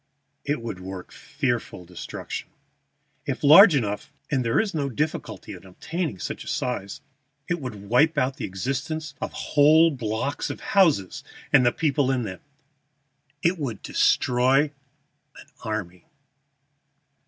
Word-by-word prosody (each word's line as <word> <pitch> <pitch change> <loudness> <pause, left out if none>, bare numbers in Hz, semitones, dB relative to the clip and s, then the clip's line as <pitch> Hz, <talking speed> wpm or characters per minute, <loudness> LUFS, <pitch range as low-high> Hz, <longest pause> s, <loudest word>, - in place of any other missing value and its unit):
"It 145 -5 -2
would 115 -6 -5
work 95 0 -8
fearful 120 -10 -3
destruction. 90 0 -7 0.8
If - - -3
large 160 +5 +9
enough 105 -1 -2 0.2
(and 135 -3 +1
there 115 -1 +2
is 215 -3 0
no 145 -3 -1
difficulty 150 +5 -4
in - - -11
obtaining 150 - -4
such - - -5
a - - -14
size), 100 -6 -3 0.5
it 175 -2 -2
would 105 -6 -7
wipe 150 +8 +3
out 130 0 +1
of - - -12
existence 135 - -3
whole 155 +3 +4
blocks 125 +1 -3
of - - -5
houses 160 - +2 0.3
and - - +7
the 120 - +4
people 145 -2 +1
in 130 -2 0
them. 95 -4 -6 1.0
It 170 +1 +2
would 120 -8 -4
destroy 130 +4 +2 0.7
an - - -13 0.2
army." 100 -5 -5
130 Hz, 130 wpm, -25 LUFS, 110-150 Hz, 1.0 s, large